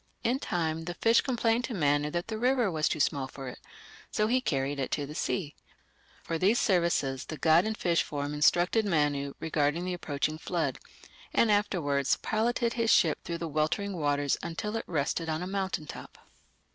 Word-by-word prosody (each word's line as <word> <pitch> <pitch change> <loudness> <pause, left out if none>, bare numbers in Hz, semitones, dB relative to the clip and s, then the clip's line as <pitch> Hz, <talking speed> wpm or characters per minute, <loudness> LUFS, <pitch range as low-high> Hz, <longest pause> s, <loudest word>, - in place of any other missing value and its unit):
In 250 +3 +1
time 160 -5 -2
the 175 +1 -5
fish 230 0 +4
complained 235 -2 +1
to 240 - -5
Manu 145 -3 +2
that 175 +3 -3
the 220 -1 -4
river 250 -4 +2
was 155 -2 +1
too 155 - -2
small 135 -1 +1
for 135 0 -9
it, - - -10 0.5
so 210 - +1
he 250 +4 +2
carried 140 - -1
it 135 - -1
to 145 - -1
the 145 - -8
sea. 155 -1 -2 0.7
For 165 -1 -3
these 205 +7 +3
services 170 - +1
the 155 - -6
god 160 +5 +4
in 220 0 -1
fish 170 -5 +1
form 145 -1 -4
instructed 175 +8 +3
Manu 145 -7 0
regarding 155 +2 0
the 185 - -2
approaching 155 -2 -2
flood, - - -2 0.6
and 230 - +4
afterwards 165 -10 +1
piloted 235 +2 0
his 230 -1 0
ship 155 -3 +3
through 170 - -4
the 170 - -4
weltering 155 +6 -1
waters 145 -3 0
until 210 +6 -4
it 225 - -3
rested 160 +1 -1
on 160 +2 -2
a - - -3
mountain 190 -4 -2
top. - - -10
165 Hz, 185 wpm, -29 LUFS, 145-210 Hz, 0.7 s, fish